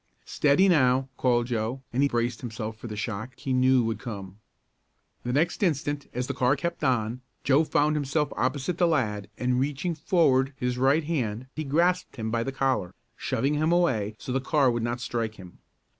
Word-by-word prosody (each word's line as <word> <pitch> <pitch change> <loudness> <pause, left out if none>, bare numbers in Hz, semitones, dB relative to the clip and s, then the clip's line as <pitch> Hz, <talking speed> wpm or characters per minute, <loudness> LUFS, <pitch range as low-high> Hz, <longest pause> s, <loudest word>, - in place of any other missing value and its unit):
"Steady 150 +7 +3
now!" 130 -6 +3
called 120 -2 +2
Joe, 120 +2 -2
and 130 - +1
he 140 - +3
braced 120 -2 -1
himself 110 -2 -5
for 110 - -9
the 110 - -6
shock 110 +3 -4
he 135 -2 -3
knew 130 0 +4
would 110 -2 -2
come. 100 -5 -7 0.8
The 125 - -3
next 155 - +1
instant, 145 -5 0
as 125 +1 -2
the 140 - -3
car 125 +1 +2
kept 170 +4 -4
on, 120 -1 0 0.2
Joe 140 +3 +4
found 150 0 +2
himself 145 0 0
opposite 140 +6 -1
the 175 - +4
lad 105 - 0
and 125 0 +1
reaching 145 +6 -1
forward 140 -5 +2
his 125 -1 -2
right 140 +5 +3
hand 125 -7 -2
he 155 - -3
grasped 175 +5 +1
him 110 -2 -3
by 115 0 0
the 135 - -2
collar, 130 -9 -1 0.2
shoving 140 +2 -1
him 155 +2 +1
away 115 -13 +1
so 125 - -6
the 135 +1 0
car 135 -2 +3
would 120 0 -1
not 120 +1 -2
strike 115 -2 -2
him. 90 -3 -13
130 Hz, 190 wpm, -27 LUFS, 115-145 Hz, 0.8 s, knew